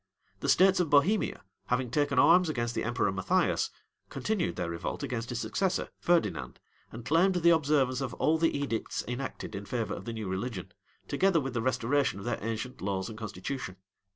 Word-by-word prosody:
The - - -2
states 190 0 +5
of 175 -4 +1
Bohemia, 145 - +2 0.2
having 125 -1 0
taken 145 0 +1
arms 175 +5 +6
against 120 -5 -1
the - - -2
emperor 120 -4 0
Matthias, 95 -1 +1 0.4
continued 195 - -1
their 85 -1 -3
revolt 85 0 -4
against 115 -2 -3
his 120 - -3
successor, 190 +7 -1
Ferdinand, 95 - 0 0.3
and 115 +1 -9
claimed 180 +5 +3
the 170 -1 +5
observance 140 -5 +2
of 130 -3 -3
all 160 +1 +2
the 165 -3 +2
edicts 135 -6 -2
enacted 125 -1 -5
in 100 0 -6
favor 120 -3 -2
of - - -7
the 115 - -4
new 110 -3 -4
religion, 95 0 -4 0.4
together 190 -3 +3
with 135 -3 -4
the 115 - -1
restoration 130 0 +1
of 100 - -8
their - - -1
ancient 115 +3 -4
laws 95 -1 -2
and 110 - -8
constitution. 105 0 -5
125 Hz, 180 wpm, -30 LUFS, 110-155 Hz, 0.4 s, arms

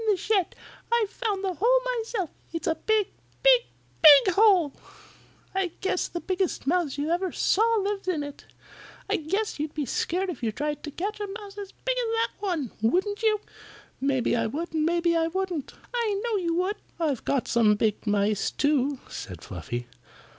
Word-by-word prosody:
"In 425 - +5
the - - -1
shed. 390 -1 0 0.4
I 470 -2 +4
found 415 -4 -2
the 380 -1 0
hole 485 +7 +4 0.2
myself. 440 -7 -3 0.2
It's 330 -2 -4
a - - +2
big, 425 +3 +1 0.3
big, - - +7 0.4
BIG 305 +3 +9
hole. 380 -7 +5 0.8
I 380 -3 -1
guess 380 -1 0
the 345 - -5
biggest 370 -3 -1
mouse 315 -2 +1
you 295 +3 -1
ever 360 +1 0
saw 405 - +2
lives 400 -2 -1
in 325 -5 0
it. 285 -1 -9 0.6
I - - +1
guess 390 +5 -2
you'd 300 0 -3
be 300 -2 -1
scared 360 +9 -1
if 330 - -9
you 230 -2 0
tried 295 +5 -3
to - - -4
catch 405 +8 -4
a 415 - -3
mouse 405 0 -8
as 400 -1 -7
big - - -2
as 460 -2 -1
that 455 0 +1
one; 340 - -2
wouldn't 380 - +1
you?" 430 -2 +2 0.6
"Maybe 265 -3 +1
I 230 -1 +1
would 320 +9 -4
and 315 0 +1
maybe 340 0 +2
I 325 0 +2
wouldn't." 350 -4 -3 0.2
"I 445 -5 0
know 470 -2 0
you 340 -3 0
would." 370 +4 0 0.2
"I've 295 -7 0
caught 275 -3 0
some 220 -3 +4
big 215 +1 -1
mice, 205 0 +1
too," 285 -1 +1
said 90 -4 -8
Fluffy. 115 +7 -5
345 Hz, 185 wpm, -26 LUFS, 290-405 Hz, 0.8 s, BIG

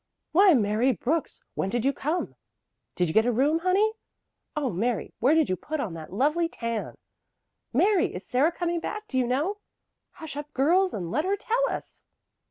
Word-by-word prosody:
"Why, 375 0 +6
Mary 220 +3 +2
Brooks! 285 - -2
When 190 - -2
did 240 +3 -1
you 275 - +3
come?" 315 +7 -2 0.6
"Did 180 - +1
you 160 - -3
get 220 +2 +4
a - - +3
room, 285 +7 +2
honey?" 380 +5 +2 0.6
"Oh, 285 -5 -1
Mary, 220 +6 -1
where 270 +7 +4
did 320 -2 +3
you 185 - 0
put 310 - -5
on 210 -10 -3
that 160 -2 -9
lovely 300 - +1
tan?" 230 -7 -4 0.8
"Mary, 395 - +2
is 180 - -7
Sarah 275 +7 +2
coming 345 0 -2
back, 425 +5 -5
do 260 - -1
you 250 - +1
know?" 300 +12 0 0.6
"Hush 320 -5 -9
up, 295 0 -6
girls, 360 +8 +3
and 175 -4 -4
let 300 +6 +1
her 390 +3 0
tell 480 +5 0
us!" - - -7
290 Hz, 185 wpm, -26 LUFS, 230-345 Hz, 0.8 s, Why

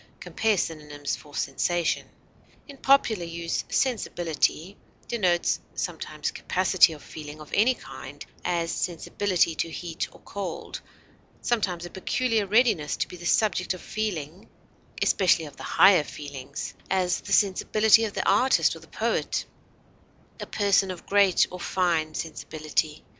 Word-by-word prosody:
(Compare 220 -2 0
synonyms 150 -4 -3
for 145 -2 -14
SENSATION.) 175 -2 0 0.6
In 280 -2 -11
popular 255 -9 +3
use 170 0 -3
sensibility 175 - 0 0.3
denotes 180 -7 +1 0.2
sometimes - - -3
capacity 185 -1 +3
of 150 - -12
feeling 150 -1 -9
of 155 - -12
any 240 +5 +4
kind; - - -10 0.2
as, 170 -1 0
sensibility 180 0 0
to 165 - -2
heat 165 0 -4
or - - -17
cold; 195 -4 -6 0.6
sometimes, 185 -7 0
a 175 - -9
peculiar 220 +2 0
readiness 210 -8 +2
to - - -1
be - - -10
the 175 0 -6
subject 190 -3 +2
of 185 - -11
feeling, 185 -5 -4 0.5
especially 175 -4 +3
of 145 -2 -11
the - - -10
higher 190 -6 +5
feelings; 140 -2 -7 0.2
as, 185 -2 +1
the - - -9
sensibility 215 +2 +4
of 210 - -5
the - - -2
artist 230 +7 +4
or - - -10
the - - -16
poet; - - -1 0.9
a - - -6
person 200 -2 +2
of 185 -2 -7
great 200 -2 +4
or 180 - -7
fine 170 -4 0
sensibility. 155 -1 -3
180 Hz, 135 wpm, -26 LUFS, 160-205 Hz, 0.9 s, higher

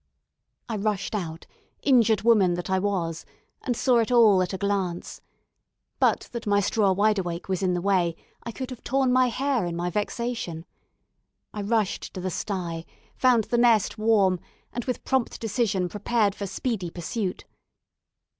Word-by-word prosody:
I 225 - -3
rushed 205 -1 -2
out, 165 -6 -4 0.4
injured 230 -6 +4
woman 205 -7 +4
that 175 +2 -5
I 190 - +3
was, 180 -5 -2 0.4
and 245 -4 -2
saw 250 -2 +3
it 230 +2 0
all 220 -6 +6
at 180 - -1
a 190 - -3
glance. 195 -3 -2 0.8
But - - +3
that 235 -2 -6
my 205 0 +3
straw 205 0 +2
wide 205 +2 +2
awake 175 -2 -4
was 190 -1 -1
in 180 -2 +1
the 175 - -3
way, 180 -4 +2 0.3
I 235 - -6
could 260 +2 -6
have 250 - -9
torn 265 -1 +1
my 255 0 +4
hair 260 -1 0
in 175 -1 -3
my 175 +1 -2
vexation. 210 -5 -3 0.9
I 210 - -4
rushed 210 -1 -1
to - - -4
the 185 0 -3
sty, 170 -3 -3 0.3
found 250 -3 +4
the 240 +3 0
nest 230 -3 +3
warm, 205 -5 +3 0.3
and 240 - -4
with 250 - -3
prompt 265 -3 0
decision 210 -4 0
prepared 210 +1 0
for 200 -1 -5
speedy 190 -1 -3
pursuit. 180 +3 -4
205 Hz, 165 wpm, -26 LUFS, 185-235 Hz, 0.9 s, all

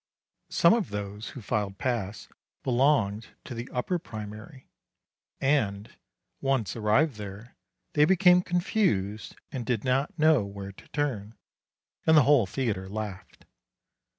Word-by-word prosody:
Some 170 - +5
of 230 -4 0
those 105 +1 -5
who 120 - -8
filed 100 -1 -2
past 105 -4 -3 0.3
belonged 120 -5 +1
to - - -7
the 120 +2 -6
upper 170 +8 -1
primary, 110 0 -9 0.7
and, 110 -8 0 0.5
once 135 -8 0
arrived 115 +5 +2
there, 105 +3 -9 0.4
they 150 0 +5
became 180 +1 +5
confused 175 - 0 0.2
and 130 -3 -4
did 115 -2 -1
not 135 +5 0
know 155 -6 +4
where 100 0 -7
to 95 - -17
turn, 115 -8 -3 0.7
and 160 -1 +7
the 150 - +7
whole 130 -6 +4
theatre 100 -4 -2
laughed. 105 -2 -7
115 Hz, 125 wpm, -28 LUFS, 105-145 Hz, 0.7 s, and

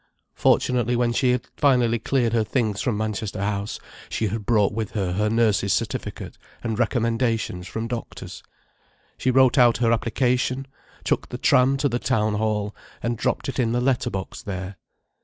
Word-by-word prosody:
Fortunately, 125 -1 +2
when 120 0 +1
she 125 +2 +2
had 125 -1 +1
finally 125 -5 +3
cleared 120 0 0
her 115 -2 +3
things 110 -3 -1
from 120 -5 0
Manchester 110 -2 -3
House, 100 0 -2 0.3
she 110 - -1
had 105 0 -5
brought 105 -3 +3
with 110 -1 -3
her 95 -4 -1
her 105 +3 +1
nurse's 110 -4 +2
certificate, - - -4 0.2
and 115 -2 -2
recommendations 115 -6 0
from 115 +3 -4
doctors. 120 -1 -6 0.8
She 130 - +1
wrote 130 0 +5
out 120 -2 +6
her 115 -2 +2
application, 125 +3 0 0.4
took - - -1
the 125 - -5
tram 130 +1 +4
to 140 - +1
the 120 -2 -1
Town 110 -2 +1
Hall 105 -1 -1 0.3
and 120 0 0
dropped 110 - -1
it 135 - -3
in 115 -2 +1
the 120 - +1
letterbox 125 -7 -1
there. 95 0 -6
115 Hz, 165 wpm, -24 LUFS, 105-125 Hz, 0.8 s, out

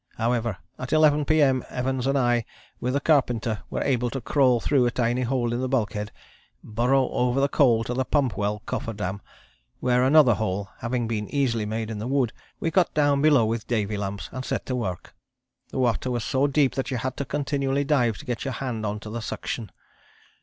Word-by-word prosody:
However, 115 -3 0 0.2
at 130 - -5
11 150 -1 +4
P.M. 140 -4 +3
Evans 130 0 -2
and 140 +1 +2
I 120 -2 +2 0.4
with 125 +1 -1
the - - +3
carpenter 120 -8 +1
were - - -2
able 125 -3 +1
to 135 - -4
crawl 130 -2 +3
through 130 +1 +2
a - - +3
tiny 120 +1 0
hole 120 -1 0
in 120 - -1
the 130 - -1
bulkhead, 105 -5 -1 0.5
burrow 125 +4 +1
over 125 +2 +1
the 140 - +3
coal 120 -6 +3
to 125 - -3
the 130 +1 0
pump 135 -2 +1
well 105 +1 -2
cofferdam, 100 -3 -4 0.6
where, 125 0 +2
another 135 -2 +6
hole 100 -2 -2
having 120 0 -1
been 105 -2 -3
easily 120 -7 0
made 110 +1 -3
in 105 - -5
the 110 - -4
wood, 130 -3 +1 0.3
we 165 - -1
got 185 -1 +3
down 145 -2 +3
below 145 -6 +5
with 110 0 -2
Davy 105 -3 -1
lamps 100 0 -4
and 130 +1 -5
set - - -3
to 130 - -2
work. 95 -8 -4 0.6
The - - -6
water 125 0 +1
was 120 -2 -1
so 135 +5 +1
deep 140 -1 +2
that 135 - -2
you 130 - -1
had 130 +2 -3
to - - -1
continually 140 0 -1
dive 125 -7 +2
to - - -11
get 120 -4 -3
your 135 - -3
hand 115 -4 -3
on 105 +1 -3
to 105 - -8
the 115 +1 -4
suction. 110 0 -5
125 Hz, 205 wpm, -25 LUFS, 115-135 Hz, 0.6 s, another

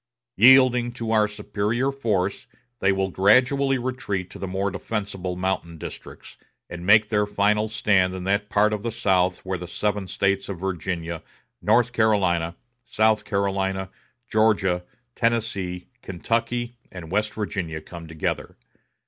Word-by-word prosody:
Yielding 125 0 +6
to 115 -2 -4
our 110 -1 +4
superior 105 +5 -1
force, 105 -7 -1 0.3
they 95 - +3
will 95 0 -1
gradually 130 +8 +3
retreat 120 -7 -3
to - - -10
the 95 - -4
more 95 +2 -1
defensible 95 -2 -4
mountain 90 -2 -2
districts, - - -10 0.3
and 85 0 -7
make 105 +1 +6
their 105 -1 +1
final 105 +1 +1
stand 100 -4 +2
in 95 - -5
that 100 +2 0
part 105 +1 +3
of 105 - -2
the 115 - -2
South 95 -4 +1
where 95 -1 -2
the 90 - -7
seven 105 +1 -2
States 100 +1 0
of 100 - -4
Virginia, 85 -3 -3 0.4
North 120 +3 +3
Carolina, 95 -7 +2 0.3
South 110 -2 +1
Carolina, 95 -1 -1 0.4
Georgia, 105 -6 +2 0.3
Tennessee, 105 -6 -1
Kentucky, 115 +5 -2
and 85 -3 -9
West 105 +2 0
Virginia 95 -7 -3
come 85 0 -10
together. 80 -1 -4
100 Hz, 140 wpm, -24 LUFS, 95-110 Hz, 0.4 s, Yielding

